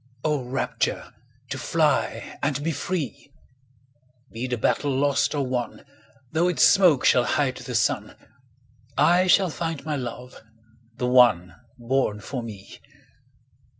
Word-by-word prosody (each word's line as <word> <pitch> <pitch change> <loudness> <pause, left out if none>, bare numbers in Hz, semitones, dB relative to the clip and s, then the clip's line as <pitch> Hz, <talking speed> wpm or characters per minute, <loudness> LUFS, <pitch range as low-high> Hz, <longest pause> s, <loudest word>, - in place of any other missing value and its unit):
O 150 -3 0
rapture, 125 +2 -3 0.4
to - - -3
fly - - -1
And 145 0 -1
be 165 - 0
free! 145 -2 -4 1.0
Be 120 +3 -4
the 125 -1 -2
battle 145 +5 0
lost 140 +2 +1
or 140 -2 0
won, 125 -1 -3
5 - - -20 0.5
Though 165 +2 +2
its 180 - +2
smoke 180 -9 +5
shall 125 - +5
hide 130 +1 0
the 125 -1 -6
sun, - - 0 0.8
I 180 +2 +4
shall 185 -1 +4
find 165 -2 -4
my 150 -2 -2
love—the 115 -1 -9
one 120 -9 +4 0.2
Born 120 -3 -1
for 125 +5 -5
me! 105 -4 -10
130 Hz, 130 wpm, -24 LUFS, 120-150 Hz, 1.0 s, smoke